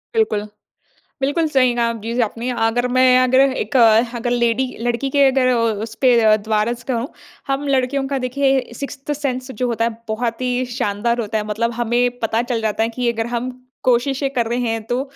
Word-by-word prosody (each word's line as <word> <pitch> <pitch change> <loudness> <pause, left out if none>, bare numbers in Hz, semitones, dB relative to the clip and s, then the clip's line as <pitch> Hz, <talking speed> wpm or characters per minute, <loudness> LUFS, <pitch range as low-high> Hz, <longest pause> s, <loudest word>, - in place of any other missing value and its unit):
बिल्कुल। 210 - +1 0.7
बिल्कुल 290 +4 +1
सही 255 -4 +3
कहा 235 -1 +1
जी 230 +3 -3
आपने। 230 +4 -6 0.2
अगर 245 +2 0
मैं 255 0 +4
अगर 260 +1 +4
एक 270 +1 +1 0.4
अगर 240 +1 -2
लेडी 240 +1 +1 0.2
लड़की 240 +3 -1
के 280 0 +4
अगर 260 -1 +2
अ, 255 - +3 0.3
उस 225 0 -6
पे 245 -3 +5
अ, 215 -1 +5
द्वारा 215 +2 0
से 245 +1 -9
कहूँ। 235 +4 -2 0.4
हम 275 +1 -2
लड़कियों 270 +1 +1
का 275 -1 -1
देखिए, 265 0 0
सिक्स्थ 280 +2 -5
सेंस 265 -3 -3
जो 250 0 -2
होता 230 -1 0
है 235 - +1 0.2
बहुत 230 +2 -2
ही 250 0 0
शानदार 235 0 0
होता 220 0 -2
है। 210 - -3
मतलब 230 +3 -1
हमें 245 +1 +1
पता 225 +1 0
चल 240 -2 -2
जाता 220 0 0
है 225 - +1
कि 240 -1 +1
अगर 225 0 -3
हम 245 +2 -2 0.3
कोशिशें 265 +3 +1
कर 240 -4 -1
रहे 240 +2 -1
हैं 225 -2 -1
तो 245 +3 -1
245 Hz, 200 wpm, -19 LUFS, 230-265 Hz, 0.7 s, पे